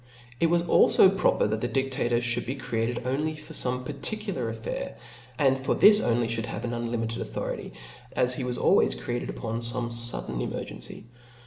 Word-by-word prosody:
It 165 - +4
was 170 +1 +2
alfo 190 +2 +5
proper 185 - +2
that 110 +1 -1
the 120 - -1
didlator 130 -3 0
fhould 120 0 0
be 130 - -2
created 120 -2 -2
only 150 +5 -1
for 155 +1 -10
fome 125 -3 -1
particular 150 - -2
affair, 115 0 -5 0.4
and 135 -1 +3
for 130 - 0
this 210 0 +7
only 115 0 +1
fliould 115 -1 -2
have 115 - -5
an 120 - -3
unlimited 115 -1 -2
authority, 110 - -5 0.4
as 125 0 +4
be 130 - -3
was 125 -1 -1
always - - +3
created - - -4
upon 110 - -4
fome 120 0 0
fudden 115 - -2
emergency. - - -6
120 Hz, 175 wpm, -27 LUFS, 115-135 Hz, 0.4 s, this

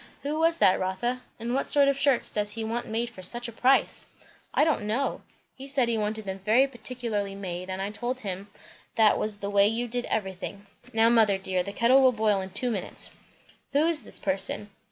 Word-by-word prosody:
Who 295 +2 -2
was 330 +1 +3
that, 185 - +4
Rotha? 190 +7 -2 0.2
and 235 +2 -3
what 270 - 0
sort 285 -1 +4
of 280 - +3
shirts 275 -2 +3
does 210 -1 -1
he 225 0 -4
want 230 +2 -3
made 235 +2 -2
for 190 - -11
such 240 +7 -2
a - - -7
price?" 255 +4 +2 0.4
"I - - +3
don't 300 -9 0
know! 250 +6 -1 0.3
he 270 +1 -10
said 270 -3 +2
he 235 - 0
wanted 215 0 -3
them 190 0 -5
very 220 +7 +4
particularly 235 -5 -4
made, 185 -2 -6
and 190 +1 -3
I 200 - -3
told 245 +4 -3
him 195 0 -5 0.5
that 220 -2 +4
was 215 -1 +1
the 200 0 -5
way 200 0 +5
you 230 +3 -1
did 245 +1 -2
everything. 195 0 -4 0.3
Now 225 0 +4
mother 220 -4 +4
dear, 190 -1 -2
the 200 - -5
kettle 240 +6 +4
will 260 -1 +5
boil 215 -3 +1
in 190 - -6
two 240 +6 -1
minutes." 195 -5 +1 0.6
"Who 290 +3 +3
is 330 -2 +1
this - - 0
person?" 195 +2 +1
220 Hz, 215 wpm, -27 LUFS, 200-250 Hz, 0.6 s, way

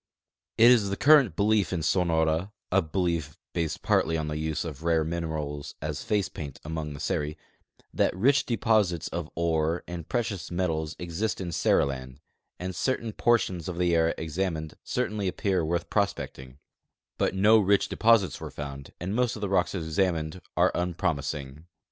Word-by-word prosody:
It 120 +2 +8
is 110 -5 +4
tlie 100 - -2
current 145 -5 +6
belief 105 -3 +2
in 85 -4 -1
Sonora 80 +1 +1 0.2
(a 95 +1 +4
belief 85 -3 -2 0.2
based 85 -3 -2
partly 80 0 +2
on 80 -1 -3
the 75 - -3
use 80 +1 -2
of 80 -3 -7
rare 85 -1 +2
minerals 80 -3 -4
as 75 -1 -4
face 105 -3 +1
paint 70 -4 -8
among 75 -2 -4
the - - -9
Seri) 75 -1 -2 0.6
that - - +1
rich 135 +8 +3
deposits 105 -7 +1
of 85 -2 -4
ores 80 0 0
and 85 -2 -7
precious 110 -7 -2
metals 80 -3 -1
exist 90 +5 -2
in 90 -3 -4
Seriland, 65 -5 0 0.4
and 90 0 -4
certain 115 - -1
por 120 +2 +4
tions 90 -6 -4
of 85 - -5
the 90 -1 +2
area 80 0 +3
examined 80 -1 -3
certainly 105 -5 -1
appear 95 -1 0
worth 85 +2 -1
prospecting; 65 -10 -2 0.6
but - - +1
no 105 +3 +6
rich 100 0 +3
deposits 115 -4 +3
were - - -5
found, 70 -1 -8
and 90 +3 -3
most 125 -1 +1
of 105 - -8
the 100 - -1
rocks 95 0 +1
examined 80 0 -1 0.2
are - - +4
unpromising. 75 -4 -2
85 Hz, 165 wpm, -27 LUFS, 80-100 Hz, 0.6 s, It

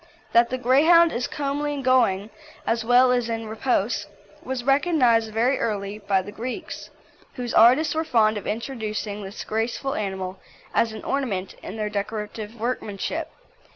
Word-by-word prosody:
That 235 0 +5
the 255 - -2
Greyhound 315 +7 +5
is 245 +1 -1
"comely 290 0 -2
in 275 - -5
going," 225 -6 +2 0.3
as 230 0 0
well 250 +2 +5
as 245 -2 +1
in 225 0 -3
repose, 220 -2 -1 0.3
was 260 -1 -4
recognised 260 -6 +3
very 240 +5 +1
early 205 -1 -2
by 200 -2 +1
the 205 - -8
Greeks, 240 +4 -6 0.5
whose 245 -2 -4
artists 255 +8 +5
were 320 +1 0
fond 220 -7 +3
of 205 - -5
introducing 215 -3 -4
this 195 +2 -7
graceful 230 +5 -2
animal 190 -2 -4 0.3
as 230 - +2
an 220 - -8
ornament 215 -10 -2
in - - -7
their 210 -1 -2
decorative 210 +1 -4
workmanship. 245 - -3
230 Hz, 155 wpm, -24 LUFS, 210-260 Hz, 0.5 s, That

